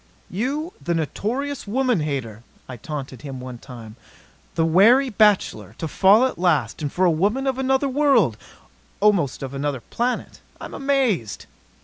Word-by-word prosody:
"You, 280 - -3
the 170 - -1
notorious 240 - -3
woman 250 -1 +1
hater," 130 -8 -4 0.3
I 130 - -7
taunted 135 +1 -7
him 135 -3 -7
one 125 -1 -8
time, 115 -3 -11 0.6
"the 165 - +2
wary 230 +11 +5
bachelor 195 - +2
to 160 - -4
fall 200 - +5
at 260 - -3
last. 155 -9 +1
And 145 -2 -2
for 185 - +1
a 175 - +4
woman 205 - 0
of 265 -1 -1
another 265 +1 +1
world 265 - +3 0.6
almost 195 - +2
of 135 0 -6
another 140 -2 -3
planet! 245 - -3 0.2
I'm - - -8
amazed!" 260 - 0
185 Hz, 150 wpm, -22 LUFS, -, 0.6 s, wary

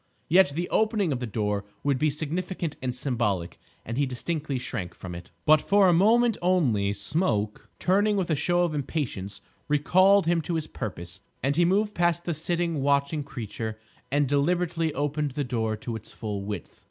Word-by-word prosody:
Yet 185 0 +5
the 175 +2 -1
opening 215 -5 +1
of 130 - -1
the 125 - -3
door 105 -1 -1 0.2
would 140 -2 +1
be 155 - +3
significant 165 +2 -3
and 125 -1 -2
symbolic, 115 -10 -1 0.3
and 115 +4 -3
he 140 - +2
distinctly 145 +2 -3
shrank 110 -8 -5
from 90 -2 -8
it. 85 0 -9 0.2
But 155 0 +6
for 200 -1 +4
a 180 - +5
moment 225 +6 +4
only. 135 - +2
Smoke, 105 - -1
turning 205 +3 +2
with 180 -3 0
a - - +3
show 175 +4 +2
of 170 -3 0
impatience, 130 -9 -3 0.3
recalled 185 +6 +4
him 170 0 +2
to 170 +2 -3
his 160 -2 -1
purpose, 90 - -6 0.2
and 140 +2 +1
he 175 +2 +4
moved 205 +4 +2
past 175 -1 +1
the 170 - 0
sitting, 170 0 -1
watching 140 +2 +1
creature, 110 -4 -6 0.3
and 145 0 +2
deliberately 165 +3 +1
opened 145 0 -1
the 145 - -1
door 110 -4 -1
to 115 +1 -5
its 110 - -9
full 105 -3 -4
width. 100 -2 -6
145 Hz, 180 wpm, -26 LUFS, 115-175 Hz, 0.3 s, But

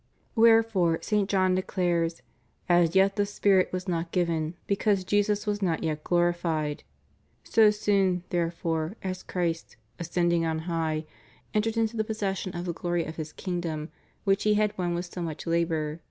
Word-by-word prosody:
Wherefore 225 -7 +4
St. 210 -2 +1
John 185 -2 +3
declares: 175 -3 0 0.4
As 175 -1 +3
yet 195 +2 +4
the 205 - +2
spirit 200 -2 +2
was 185 +1 -4
not 170 -1 -2
given, 170 -2 0
because 200 -1 +1
Jesus 205 +2 +1
was 205 -1 -1
not 170 -4 0
yet 155 -2 -2
glorified^ 170 -4 0 0.6
So 220 -2 +5
soon, 195 -4 +1
therefore, 165 0 -1
as 185 -1 -3
Christ, 170 -2 -3 0.2
"ascending 170 0 +1
on 160 -1 0
high," 160 -2 -1 0.5
entered 220 +1 0
into 225 0 +1
possession 195 -4 -3
of 175 - -4
the 175 - -2
glory 175 0 -1
of 160 - -7
His 155 -1 -5
Kingdom 170 -4 -4 0.3
which 195 -1 +2
He 210 0 +3
had 210 0 +1
won 175 -2 -1
with 175 +1 -3
so 175 0 -7
much 160 -3 -5
labor. 165 -2 0
175 Hz, 155 wpm, -27 LUFS, 165-200 Hz, 0.6 s, So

